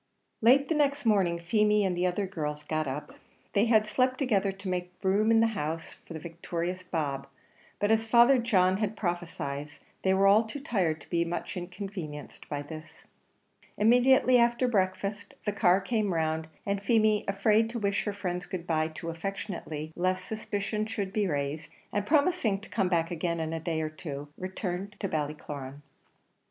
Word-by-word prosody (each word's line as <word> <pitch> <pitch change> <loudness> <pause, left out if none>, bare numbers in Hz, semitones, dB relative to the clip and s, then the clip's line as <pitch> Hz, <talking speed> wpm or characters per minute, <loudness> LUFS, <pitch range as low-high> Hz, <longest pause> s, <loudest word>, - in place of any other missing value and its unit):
Late 265 +5 +5
the - - +1
next 285 -2 +1
morning, 195 -6 +3
Feemy 210 +4 +2
and 185 -2 0
the 180 +1 +1
other 190 +3 -1
girls 150 -5 -4
got 155 -1 -1
up; 135 +3 -5 0.4
they 205 +2 +4
had 220 -2 +4
slept 255 +4 +1
together 210 -8 +1
to 195 0 -9
make 180 -1 -3
room 200 +3 +3
in 225 0 +5
the - - +5
house 165 -3 -4
for - - -8
the 160 - -5
victorious 170 +2 -4
Bob, 150 -7 -3 0.5
but 205 +1 +2
as 225 0 +2
Father 240 +3 +6
John 190 -6 +3
had 215 0 -2
prophesied, 155 -5 -3 0.3
they 190 0 +3
were 195 +1 +3
all 205 +3 +6
too 220 +6 -7
tired 180 - 0
to - - -16
be 170 -1 +2
much 170 +1 -4
inconvenienced 180 -4 -7
by 145 -1 -3
this. 155 +2 -11 0.7
Immediately 250 +3 +5
after 235 +1 +3
breakfast 200 -1 -1
the 210 - +1
car 190 -2 +4
came 205 -2 0
round, 160 0 0 0.2
and 200 0 -1
Feemy, 215 0 +3
afraid 210 +3 +3
to 235 - -4
wish 200 -3 0
her 205 - -1
friends 180 -2 -3
good 180 -2 -5
bye 155 -2 +1
too 165 +1 -6
affectionately 165 -3 -5
lest 185 +1 0
suspicion 215 0 -3
should 200 -3 -3
be 210 -2 +1
raised, 145 0 -2 0.2
and 205 0 -1
promising 290 - +2
to 205 - -12
come 185 - 0
back 165 -2 +1
again 170 0 -1
in 160 0 -2
a 165 - -2
day 160 -1 -2
or 155 - -2
two, 145 -2 -7
returned 190 +1 -4
to 200 - -1
Ballycloran. 145 -3 -4
190 Hz, 180 wpm, -29 LUFS, 165-215 Hz, 0.7 s, Father